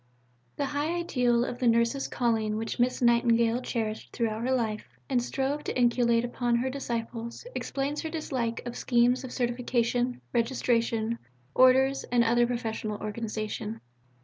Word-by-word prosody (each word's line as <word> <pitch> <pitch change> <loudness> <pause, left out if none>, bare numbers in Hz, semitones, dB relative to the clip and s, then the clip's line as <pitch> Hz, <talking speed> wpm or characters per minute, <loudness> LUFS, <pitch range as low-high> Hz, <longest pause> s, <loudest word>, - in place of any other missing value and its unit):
V 125 0 -38
The 285 - -1
high 290 +4 -1
ideal 245 -8 +1
of 245 - -5
the 250 - +1
Nurse's 235 +4 +2
calling 220 -3 0
which 225 +2 -4
Miss 250 +1 +1
Nightingale 235 0 +3
cherished 220 -3 -3
throughout 225 -2 -1
her 255 +2 0
life, 225 -4 -1 0.2
and 255 -3 +1
strove 275 +4 -2
to - - -2
inculcate 240 -1 +3
upon 240 0 0
her 255 +2 0
disciples, 235 - -4
explains 280 +2 -2
her 320 - -4
dislike 255 -8 -3
of 240 0 -5
schemes 245 +1 +2
of 260 - -7
certification, 245 0 0
registration, 230 -2 +1 0.3
orders, 265 +1 +5
and 240 -1 +3
other 240 +1 +3
professional 225 -3 -3
organization. 215 0 -4
240 Hz, 150 wpm, -28 LUFS, 230-255 Hz, 0.3 s, orders